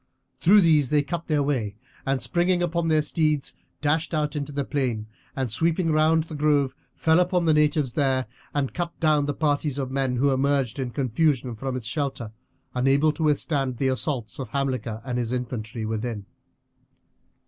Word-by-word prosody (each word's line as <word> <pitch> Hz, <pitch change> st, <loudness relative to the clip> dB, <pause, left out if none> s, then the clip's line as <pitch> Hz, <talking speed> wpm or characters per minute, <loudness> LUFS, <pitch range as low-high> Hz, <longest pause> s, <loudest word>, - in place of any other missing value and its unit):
Through 200 Hz, +4 st, +6 dB
these 155 Hz, -6 st, +4 dB
they 150 Hz, -1 st, +3 dB
cut 170 Hz, +2 st, -4 dB
their 150 Hz, -3 st, +2 dB
way, 120 Hz, -8 st, -1 dB, 0.3 s
and 135 Hz, 0 st, +1 dB
springing 175 Hz, +9 st, +1 dB
upon 170 Hz, -1 st, 0 dB
their 155 Hz, -1 st, +3 dB
steeds 155 Hz, -2 st, 0 dB, 0.3 s
dashed 155 Hz, +2 st, +1 dB
out 150 Hz, -1 st, -1 dB
into 145 Hz, 0 st, -3 dB
the 140 Hz, -1 st, -2 dB
plain, 125 Hz, -7 st, -1 dB, 0.3 s
and 130 Hz, -1 st, -1 dB
sweeping 165 Hz, -, +1 dB
round 155 Hz, +1 st, +3 dB
the 160 Hz, -, -10 dB
grove 145 Hz, -3 st, +2 dB, 0.2 s
fell 160 Hz, +1 st, +3 dB
upon 180 Hz, -1 st, +2 dB
the 160 Hz, -, +4 dB
natives 150 Hz, -4 st, +2 dB
there, 130 Hz, -2 st, +1 dB, 0.3 s
and 140 Hz, -3 st, -1 dB
cut 175 Hz, -1 st, -4 dB
down 150 Hz, -3 st, +3 dB
the 145 Hz, -, -1 dB
parties 145 Hz, -2 st, 0 dB
of 135 Hz, -2 st, -3 dB
men 135 Hz, -2 st, 0 dB
who 140 Hz, +3 st, +2 dB
emerged 135 Hz, -2 st, +1 dB
in 130 Hz, -2 st, -2 dB
confusion 130 Hz, 0 st, 0 dB
from 130 Hz, +3 st, -4 dB
its 125 Hz, -3 st, -5 dB
shelter, 130 Hz, -4 st, -3 dB, 0.4 s
unable 135 Hz, +4 st, +3 dB
to 155 Hz, -, -8 dB
withstand 145 Hz, -4 st, 0 dB
the 135 Hz, +1 st, +1 dB
assaults 130 Hz, -3 st, -3 dB
of 130 Hz, -4 st, -5 dB
Hamilcar 130 Hz, -4 st, -2 dB
and 125 Hz, -2 st, -2 dB
his 120 Hz, -1 st, -2 dB
infantry 120 Hz, -3 st, -4 dB
within. 110 Hz, -1 st, -3 dB
140 Hz, 175 wpm, -25 LUFS, 125-155 Hz, 0.4 s, Through